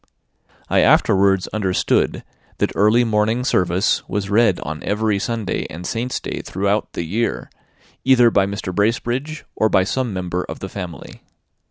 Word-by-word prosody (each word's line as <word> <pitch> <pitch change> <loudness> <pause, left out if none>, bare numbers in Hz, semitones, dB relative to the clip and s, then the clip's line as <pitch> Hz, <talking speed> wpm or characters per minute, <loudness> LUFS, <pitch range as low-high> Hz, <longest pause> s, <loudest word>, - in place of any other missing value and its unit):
I - - +2
afterwards 95 -1 +3
understood 95 -4 0 0.3
that - - 0
early 105 +4 +4
morning 110 +2 +1
service 90 -4 +1
was 100 -1 -3
read 105 -3 +3
on 80 0 -5
every 105 -1 0
Sunday 110 -2 -2
and 85 +3 -8
saint's 120 +6 -2
day - - -5
throughout 100 +3 -1
the - - -3
year, 110 +8 -2 0.5
either 125 -3 +5
by 95 -2 +3
Mr. 100 -2 -5
Bracebridge 120 - -1
or 110 - +2
by 95 - +3
some 125 +4 -2
member 90 -1 -3
of - - -7
the 95 - -7
family. 90 -4 -8
105 Hz, 150 wpm, -20 LUFS, 95-115 Hz, 0.5 s, either